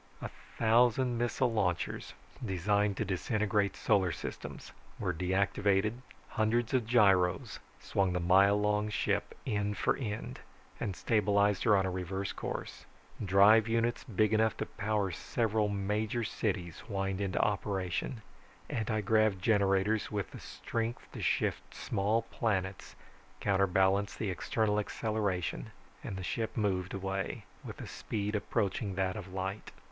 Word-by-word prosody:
A - - -6 0.3
thousand 120 +2 +3
missile 120 0 +1
launchers, 100 -6 -1 0.3
designed 100 0 +1
to 110 - -1
disintegrate 105 +1 0
solar 95 -4 +2
systems, - - -7 0.3
were 90 -2 -1
deactivated, 95 +3 +1 0.4
hundreds 115 +2 0
of 125 -4 +1
gyros 95 -7 +3 0.2
swung 95 -2 0
the 90 - 0
mile 95 +4 +5
long 105 0 +1
ship 105 - -1
end 105 0 -1
for - - +2
end 110 -5 -5 0.4
and 95 - -2
stabilized 105 -2 +2
her 105 -3 +6
on 95 - +2
a 95 - -1
reverse 95 +1 -3
course, - - -6 0.4
drive 100 +3 +6
units 115 +1 0
big 110 -3 +1
enough 110 0 +2
to - - -2
power 105 -2 -1
several 110 +3 0
major 105 +4 -1
cities 90 -6 -2
whined 95 -2 -2
into 95 -1 -2
operation, 100 +3 -1 0.5
anti 110 -1 -1
grav 110 -1 +3
generators 100 +1 +2
with 100 -3 -3
the - - -9
strength 115 +1 -4
to - - -7
shift - - -1
small 105 +4 0
planets 95 -5 -2 0.4
counterbalanced 95 0 +2
the 105 -4 -1
external 105 +4 0
acceleration, 100 - -2 0.3
and 95 - -5
the 95 - -5
ship 110 +6 -3
moved, 95 -4 0
away, 95 0 -3 0.2
with - - -8
a - - -6
speed 105 -1 -4
approaching 100 -1 -1
that 95 -1 0
of 100 -3 -7
light. 95 +2 -4
100 Hz, 135 wpm, -32 LUFS, 95-110 Hz, 0.5 s, her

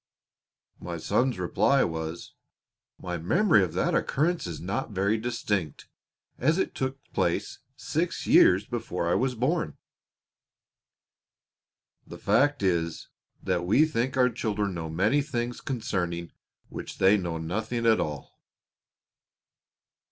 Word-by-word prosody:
My 85 -1 -5
son's 120 +8 0
reply 135 +9 +2
was, 80 0 -4 0.7
"My 90 -1 -4
memory 155 - +4
of 90 - -3
that - - 0
occurrence 165 - 0
is 85 - -6
not 100 +11 -3
very 100 +1 +1
distinct, 105 - -2 0.5
as 155 +7 +2
it 190 - -1
took 130 0 -2 0.2
place - - -1 0.2
six - - -2
years 95 +4 +5
before 100 -8 -3
I 85 - +2
was 130 0 +1
born." 145 +8 -1 2.3
The - - -9
fact 145 -4 +2
is 85 -3 -1 0.3
that 90 -2 0
we 105 - +4
think 130 -3 -1
our 125 -1 +4
children 105 -4 -2
know 80 -2 -5
many 105 - +2
things 120 -4 -3
concerning 90 -9 -3 0.4
which - - -7
they 95 +2 +5
know 85 -5 -2
nothing 110 +8 -3
at 115 -1 +5
all. 75 -3 -5
105 Hz, 120 wpm, -27 LUFS, 85-130 Hz, 2.3 s, years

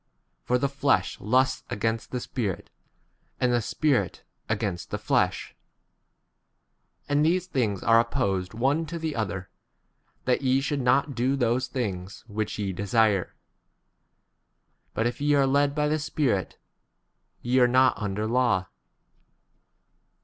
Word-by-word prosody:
For 125 - +1
the 140 - +1
flesh 140 -9 0
lusts 130 +4 +2
against 115 +2 -2
the 125 - -3
Spirit, 110 -6 -4 0.7
and 125 -1 +2
the 120 - +2
Spirit 125 - 0 0.3
against 100 -5 -2
the - - -2
flesh; - - 0 1.5
and 145 +1 +2
these 175 +3 +2
things 115 - -1
are 115 0 +5
opposed 110 -6 -1
one 140 +7 +1
to 170 +3 -5
the 160 -2 -3
other, 95 -5 -3 0.7
that 125 +2 +2
ye 130 0 +2
should 140 0 -1
not 140 +3 +2
do 125 +3 +1
those 125 -1 +1
things 95 -7 -4
18 105 - -13
which 110 0 -2
ye 100 -2 -2
desire; 100 0 +1 1.6
but 115 - 0
if 120 +4 -2
ye 145 0 +3
are 140 -1 +4
led 140 +1 +2
by 150 -1 +1
° - - 0
the 155 - +1
Spirit, 135 - -1 0.9
ye 125 +2 +2
are 125 - +6
not 130 +1 +4
under 105 -1 -3
19 110 +2 -2
law. 120 -8 +2
125 Hz, 140 wpm, -26 LUFS, 105-140 Hz, 1.6 s, are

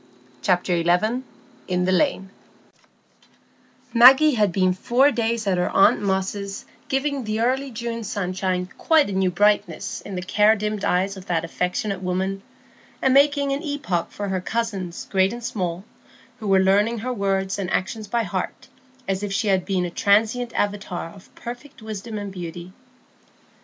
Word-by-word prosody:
Chapter 180 +1 +1
XI. 215 +9 +2 0.5
In 180 -1 0
the 185 - +1
Lane 190 -3 +1 1.6
Maggie 265 +6 +8
had 210 -5 +2
been 185 0 +2
four 250 +9 +3
days 230 -2 -1
at 185 -2 +1
her 180 - +1
aunt 195 - +4
Moss's 195 0 -2 0.2
giving 275 0 -1
the 215 0 -2
early 265 +3 0
June 230 -1 -5
sunshine 185 -3 -2
quite 315 -9 +3
a - - -4
new 190 -1 +2
brightness 205 +4 +1
in 200 - -7
the 180 - -4
care 210 +3 +4
dimmed 210 -1 -3
eyes 190 +2 +1
of 190 0 -11
that 165 -2 0
affectionate 180 +3 -2
woman, 190 +2 -2 0.6
and 265 - +2
making 280 0 +4
an 275 +1 -1
epoch 280 - -2
for 205 -1 -4
her 190 -1 -1
cousins 195 -4 -3
great 190 0 +3
and 240 0 -8
small, 180 -5 -3 0.6
who 215 - -5
were 195 -1 +4
learning 205 +5 +3
her 250 +3 -3
words 195 -2 -1
and 185 -3 -2
actions 210 +3 -2
by 235 +2 0
heart, 195 +7 -4 0.4
as 190 0 -1
if 205 -1 -3
she 205 +2 0
had 190 -2 +2
been 185 -3 0
a 175 - -5
transient 225 +5 +2
avatar 200 -4 -2
of 190 +2 -16
perfect 245 +5 -9
wisdom 220 0 -6
and 205 -1 -5
beauty. 175 0 -8
200 Hz, 160 wpm, -23 LUFS, 185-230 Hz, 1.6 s, Maggie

